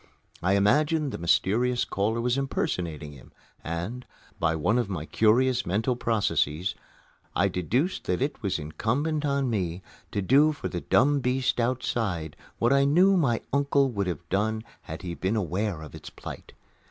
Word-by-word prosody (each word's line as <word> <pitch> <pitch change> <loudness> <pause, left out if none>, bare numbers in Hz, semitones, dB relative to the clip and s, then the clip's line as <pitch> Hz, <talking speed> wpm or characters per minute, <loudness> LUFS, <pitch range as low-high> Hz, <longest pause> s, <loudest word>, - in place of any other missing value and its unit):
I 90 +2 +2
imagined 145 +9 +2
the - - -5
mysterious 115 +8 +2
caller 110 +4 -1
was 120 +1 +1
impersonating 85 - -2
him 70 -3 -15 0.3
and, 90 +10 -4 0.4
by 80 -1 +1
one 105 +10 +1
of 115 -5 -1
my 85 -5 -4
curious 120 +6 +3
mental 110 +7 0
processes, 100 -8 0 0.6
I 100 +1 +3
deduced 120 - -1
that 90 - 0
it 140 0 -2
was 100 -4 0
incumbent 135 - -1
on 140 -1 +1
me 90 -4 -2 0.3
to 100 - -1
do 145 +9 +5
for 145 - -5
the 85 - -4
dumb 140 +3 +3
beast 125 -1 0
outside 115 - -1 0.2
what 120 +3 +3
I 140 0 +4
knew 180 +8 +5
my 135 -10 +2
uncle 140 -1 +2
would 100 -4 -2
have 85 -1 -4
done 110 +3 0 0.2
had 80 +1 -8
he 90 -2 -4
been 95 +5 -1
aware 95 -3 -2
of 75 - -11
its - - -9
plight. - - -10
110 Hz, 165 wpm, -27 LUFS, 90-130 Hz, 0.6 s, do